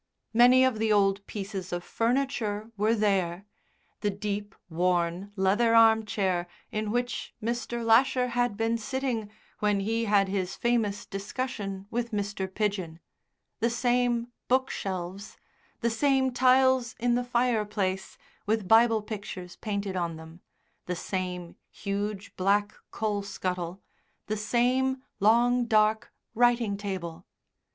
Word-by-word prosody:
Many 250 +3 +7
of 255 -4 +2
the 220 0 +1
old 200 -1 +3
pieces 195 -3 -5
of 175 0 -3
furniture 230 -3 -1
were 215 +3 +2
there 195 -3 0 0.5
the 210 - 0
deep, 205 0 -4
worn 175 +2 0
leather 210 +4 +3
arm 220 -1 +6
chair 185 -5 0 0.2
in 215 0 -2
which 245 +1 -2
Mr. 235 +1 -3
Lasher 250 +2 +4
had 245 -3 0
been 225 +1 0
sitting 245 -3 -2 0.3
when 205 -1 +1
he 225 +3 0
had 200 -2 +3
his 190 -1 -2
famous 225 -4 0
discussion 200 -1 -4
with 235 0 -1
Mr. 200 -3 -3
Pidgen, 190 -6 -2 0.6
the 235 - +2
same 240 0 +1 0.2
bookshelves, 195 -7 -2 0.4
the 235 - +2
same 265 +2 +2
tiles 260 -1 +4
in 240 0 +2
the 245 +1 +1
fireplace 215 -6 -1 0.3
with 215 -2 0
Bible 225 0 +5
pictures 195 -4 -7
painted 200 -3 -3
on 170 -2 -2
them, 160 +2 -12 0.5
the 180 - -1
same 180 -1 -4
huge 200 0 -4
black 205 +3 +1 0.2
coal 210 -2 -1
scuttle, 185 -2 -4 0.4
the 215 - -2
same 255 +4 +1 0.2
long, 240 +4 +4
dark 215 -1 +2 0.2
writing 240 -3 +3
table. 190 -5 -5
210 Hz, 125 wpm, -28 LUFS, 195-240 Hz, 0.6 s, Many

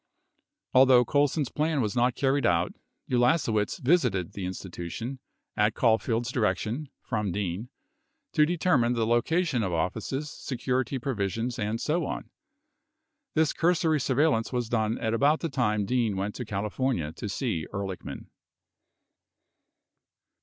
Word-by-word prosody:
38 130 - +6
Although 130 -2 +7
Colson's 145 -1 +1
plan 155 0 0
was 110 -3 -1
not 125 0 +2
carried 140 0 +1
out, 85 -5 +2 0.4
Ulasewicz 120 -4 +2
visited 125 - +2
the 95 -2 -4
Institution, 95 +7 -6 0.4
at 105 +1 +2
Caulfield's 115 0 +1
direction 115 +5 -1
(from 105 -5 -2
Dean) 100 +4 -3 0.6
to 150 - +5
determine 155 -7 +2
the 115 -2 +1
loca 120 +10 +2
tion 135 -8 0
of 95 -4 -1
offices, 110 - -2
security 130 0 -2
provisions, 115 -1 -2
and 110 +1 -1
so 160 +6 0
on. - - -3
39 - - -30 1.1
This 160 -1 +3
cursory 165 -2 +2
surveil 145 +4 +3
lance 115 -2 -1
was 120 -3 -2
done 110 -1 0
at 110 -1 -1
about 145 +7 +3
the 165 - -1
time 105 -7 0
Dean 115 -3 0
went 100 +2 -2
to 125 - -5
California 105 - -1
to 105 - -6
see 100 - -2
Ehrlichman. 100 -2 -5
120 Hz, 140 wpm, -27 LUFS, 105-135 Hz, 1.1 s, Although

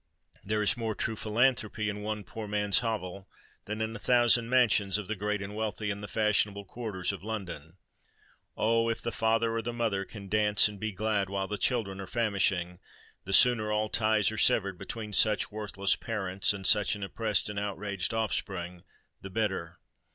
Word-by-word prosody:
There 105 +1 0
is 105 - +2
more 115 -3 -3
true 115 - -2
philanthropy 110 -1 0
in 105 0 -3
one 105 0 -4
poor 110 +2 -8
man's 105 -1 +2
hovel, 100 -5 -4 0.4
than 105 +1 -4
in 110 0 -3
a - - -7
thousand 120 -1 +4
mansions 105 -6 +3
of 105 -3 -6
the 110 - -1
great 105 0 -2
and 100 +1 -7
wealthy 105 -1 -2
in 100 +1 -5
the 105 - -6
fashionable 105 -2 +1
quarters 100 -4 -3
of 100 - -8
London. 95 -7 -6 0.8
Oh! 115 +1 +2
if 115 - -2
the 120 - -2
father 115 +1 +1
or 115 - 0
the 120 +2 -4
mother 115 -5 -1
can 100 0 -10
dance 105 +1 +4
and 105 -2 -8
be 110 +1 -3
glad 105 -1 -1
while 95 -1 -2
the 105 0 -4
children 100 -6 0
are 95 - -7
famishing, 95 -6 0 0.5
the 95 - -5
sooner 110 -1 +5
all 105 0 0
ties 110 -2 +2
are 110 - -4
severed 100 -4 +3
between 110 -2 -7
such 105 +2 +4
worthless 100 -2 -1
parents 95 -4 -1
and 100 -2 -5
such 105 0 +5
an 100 - -7
oppressed 105 +1 0
and 105 -1 -3
outraged 100 -2 -3
offspring, 95 -5 -3 0.4
the 95 - -8
better! 95 -5 -2
105 Hz, 185 wpm, -29 LUFS, 100-110 Hz, 0.8 s, sooner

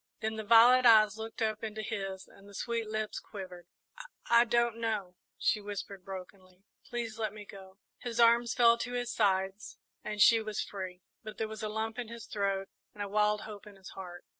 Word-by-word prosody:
Then 220 0 -2
the 220 - -4
violet 235 +4 +7
eyes 215 -3 +6
looked 225 0 -4
up 215 0 -1
into 215 0 -4
his 195 -4 -5
and 200 +1 -17
the 200 - -13
sweet 230 0 -2
lips 215 0 -3
quivered. 185 -4 -10 0.6
"I 235 0 +6
I - - +3
don't 235 -1 +1
know," 215 -5 -2 0.2
she 215 - +1
whispered 200 -2 -7
brokenly; 185 0 -10 0.2
"please 235 -3 -5
let 215 -2 -1
me 210 -1 -10
go!" 190 -1 -13 0.2
His 240 -1 -5
arms 235 0 +5
fell 235 -1 +5
to 245 +1 -4
his 245 -1 -2
sides 195 0 0 0.3
and 210 -1 -5
she 225 +2 +7
was 215 -1 -4
free, 185 -2 -5 0.2
but 215 -1 -9
there 220 - -2
was 215 0 -8
a 215 - -2
lump 220 +2 -3
in 240 - -4
his 230 0 -9
throat 195 -1 -2 0.3
and 205 - -4
a - - -4
wild 210 +1 +2
hope 210 -1 -9
in 205 - -13
his 190 -1 -12
heart. 180 -2 -9
215 Hz, 205 wpm, -31 LUFS, 195-230 Hz, 0.6 s, violet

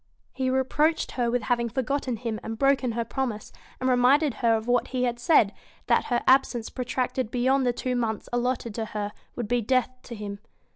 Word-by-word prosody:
He 260 -1 -1
reproached 280 +5 +1
her 240 -2 0
with 245 -1 0
having 235 0 0
forgotten 260 +1 -1
him 225 -2 -4
and 225 0 -5
broken 275 -2 +2
her 235 0 -2
promise, 235 -3 -3 0.3
and 255 - -1
reminded 260 +3 +4
her 230 -2 +4
of 220 0 -3
what 245 0 +2
he 255 -1 -2
had 240 -1 -1
said, 240 -6 +4 0.3
that - - +2
her 240 -1 0
absence 255 -3 +3
protracted 255 -1 -2
beyond 260 +2 +2
the - - +4
two 250 +1 -2
months 225 -3 -2
allotted 245 -2 -1
to 225 +1 -3
her 205 0 -3 0.2
would 240 -3 -3
be 245 +2 +1
death 255 +3 +1
to 235 - -7
him. 205 -1 -6
245 Hz, 195 wpm, -26 LUFS, 230-260 Hz, 0.3 s, reminded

